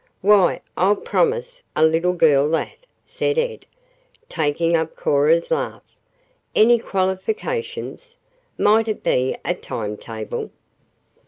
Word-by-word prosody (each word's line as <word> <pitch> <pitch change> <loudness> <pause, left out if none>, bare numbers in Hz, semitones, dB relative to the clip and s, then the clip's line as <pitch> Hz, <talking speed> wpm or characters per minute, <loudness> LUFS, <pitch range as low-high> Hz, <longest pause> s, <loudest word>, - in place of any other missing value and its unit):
"Why, 200 -2 +4
I'll 195 +3 +3
promise 485 - -1
a - - +4
'little 165 +3 +2
girl' 150 -4 +4
that," 165 - -3 0.2
said 450 - -2
Ed, 475 -1 -2 0.6
taking 165 +2 0
up 160 -1 -1
Cora's 155 +4 +2
laugh. - - -2 0.7
"Any 235 +2 +5
qualifications? 440 - -3 0.4
Might 220 +2 +3
it 215 - -3
be 130 +1 +1
a - - +1
time 105 -1 -5
table?" 110 -1 -6
185 Hz, 110 wpm, -21 LUFS, -, 0.7 s, Any